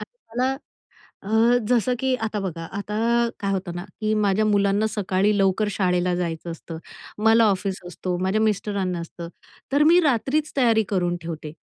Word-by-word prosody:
अ, -, -, -5 dB, 0.3 s
मला 255 Hz, +2 st, +1 dB, 0.7 s
अ, 195 Hz, -, -9 dB, 0.4 s
जसं 250 Hz, 0 st, +2 dB
की 265 Hz, 0 st, +1 dB
आता 215 Hz, -1 st, -2 dB
बघा, 170 Hz, -4 st, -4 dB
आता 210 Hz, +1 st, -4 dB, 0.4 s
काय 200 Hz, -2 st, -1 dB
होतं 185 Hz, -3 st, -3 dB
ना 175 Hz, +1 st, -5 dB, 0.2 s
की 215 Hz, 0 st, 0 dB
माझ्या 210 Hz, 0 st, +2 dB
मुलांना 205 Hz, 0 st, +2 dB
सकाळी 205 Hz, 0 st, 0 dB
लवकर 195 Hz, +2 st, +2 dB
शाळेला 180 Hz, -2 st, +1 dB
जायचं 170 Hz, -1 st, -3 dB
असतं, 165 Hz, 0 st, -8 dB, 0.5 s
मला 225 Hz, +1 st, +6 dB
ऑफिस 195 Hz, 0 st, -2 dB
असतो, 180 Hz, 0 st, -4 dB
माझ्या 190 Hz, +3 st, +1 dB
मिस्टरांना 200 Hz, -4 st, -1 dB
असतं 170 Hz, 0 st, -8 dB, 0.4 s
तर 285 Hz, -, +4 dB
मी 340 Hz, +3 st, +6 dB
रात्रीच 295 Hz, +1 st, 0 dB
तयारी 230 Hz, -4 st, +4 dB
करून 175 Hz, -3 st, 0 dB
ठेवते 160 Hz, -2 st, -6 dB
200 Hz, 160 wpm, -23 LUFS, 180-220 Hz, 0.7 s, मला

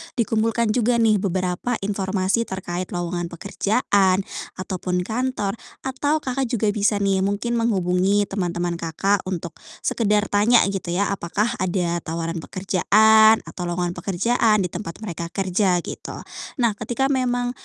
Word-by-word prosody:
dikumpulkan 225 Hz, -1 st, +1 dB
juga 240 Hz, +1 st, +2 dB
nih 215 Hz, -2 st, +4 dB
beberapa 185 Hz, +4 st, -1 dB
informasi 195 Hz, +2 st, 0 dB
terkait 185 Hz, -1 st, -5 dB
lowongan 175 Hz, 0 st, -2 dB
pekerjaan 195 Hz, +1 st, +1 dB, 0.4 s
ataupun 185 Hz, -1 st, -2 dB
kantor 230 Hz, -2 st, -2 dB, 0.3 s
atau, 285 Hz, +4 st, 0 dB
Kakak 265 Hz, +1 st, -1 dB
juga 220 Hz, -2 st, +1 dB
bisa 205 Hz, 0 st, +2 dB
nih 195 Hz, -1 st, +2 dB
mungkin 205 Hz, +4 st, -1 dB
menghubungi 195 Hz, -2 st, +2 dB
teman-teman, 175 Hz, -2 st, -2 dB
Kakak, 195 Hz, +5 st, 0 dB
untuk 170 Hz, -3 st, -4 dB, 0.3 s
sekedar 210 Hz, -2 st, +1 dB
tanya 215 Hz, +4 st, +5 dB
gitu 195 Hz, -3 st, -4 dB
ya, 200 Hz, +2 st, +1 dB
apakah 200 Hz, +4 st, -1 dB
ada 175 Hz, -2 st, 0 dB
tawaran 165 Hz, +1 st, -3 dB
pekerjaan 215 Hz, +5 st, +4 dB
atau 180 Hz, -, -6 dB
lowongan 175 Hz, 0 st, -1 dB
pekerjaan 210 Hz, +4 st, +2 dB
di -, -, 0 dB
tempat 170 Hz, -3 st, -6 dB
mereka 170 Hz, -4 st, -4 dB
kerja 190 Hz, -1 st, +1 dB
gitu. -, -, -7 dB, 0.5 s
Nah 235 Hz, -2 st, +4 dB
ketika 240 Hz, +5 st, -1 dB
memang 245 Hz, -2 st, 0 dB
200 Hz, 135 wpm, -22 LUFS, 180-225 Hz, 0.5 s, tanya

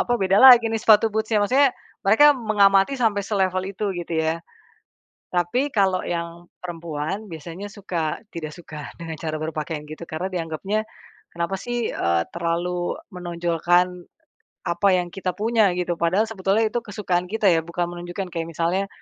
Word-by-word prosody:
apa, 245 Hz, -, 0 dB
"beda 195 Hz, -2 st, +2 dB
lagi 240 Hz, -3 st, +8 dB
nih, 225 Hz, -, 0 dB
sepatu 220 Hz, 0 st, +5 dB
boots-nya.", 220 Hz, 0 st, +1 dB
maksudnya, 265 Hz, +5 st, +4 dB, 0.4 s
mereka 295 Hz, +9 st, +7 dB
mengamati 205 Hz, -2 st, +3 dB
sampai 220 Hz, -6 st, +1 dB
selevel 190 Hz, -1 st, -1 dB
itu, 205 Hz, +1 st, -2 dB
gitu 175 Hz, -1 st, -5 dB
ya. 160 Hz, +1 st, 0 dB, 0.9 s
Tapi 210 Hz, -, 0 dB
kalau 190 Hz, -3 st, +2 dB
yang 170 Hz, 0 st, -4 dB, 0.2 s
perempuan 170 Hz, +2 st, -4 dB
biasanya, 170 Hz, +4 st, -8 dB
suka 175 Hz, -7 st, -3 dB
tidak 155 Hz, -6 st, -6 dB
suka 150 Hz, -4 st, -9 dB
dengan 165 Hz, -1 st, -6 dB
cara 155 Hz, 0 st, -4 dB
berpakaian 155 Hz, -1 st, -4 dB
gitu, 155 Hz, +2 st, -8 dB
karena 170 Hz, +3 st, -4 dB
dianggapnya, 185 Hz, +4 st, -2 dB, 0.5 s
kenapa 170 Hz, +3 st, -2 dB
sih, 240 Hz, +3 st, -3 dB
eee, 85 Hz, 0 st, +1 dB
terlalu 175 Hz, +1 st, -2 dB
menonjolkan, 175 Hz, 0 st, 0 dB, 0.6 s
apa 185 Hz, +3 st, +2 dB
yang 175 Hz, -1 st, -1 dB
kita 185 Hz, -2 st, -3 dB
punya, 215 Hz, -4 st, +2 dB
gitu. 175 Hz, -1 st, -2 dB
Padahal 180 Hz, +5 st, +2 dB
sebetulnya 195 Hz, +2 st, +1 dB
itu 240 Hz, -, 0 dB
kesukaan 190 Hz, -5 st, -2 dB
kita, 210 Hz, -1 st, +2 dB
ya. 165 Hz, -, +4 dB
Bukan 170 Hz, +1 st, -3 dB
menunjukkan 175 Hz, +1 st, -6 dB
kayak 165 Hz, -1 st, -3 dB
misalnya, 170 Hz, +4 st, -1 dB
180 Hz, 150 wpm, -23 LUFS, 170-205 Hz, 0.9 s, lagi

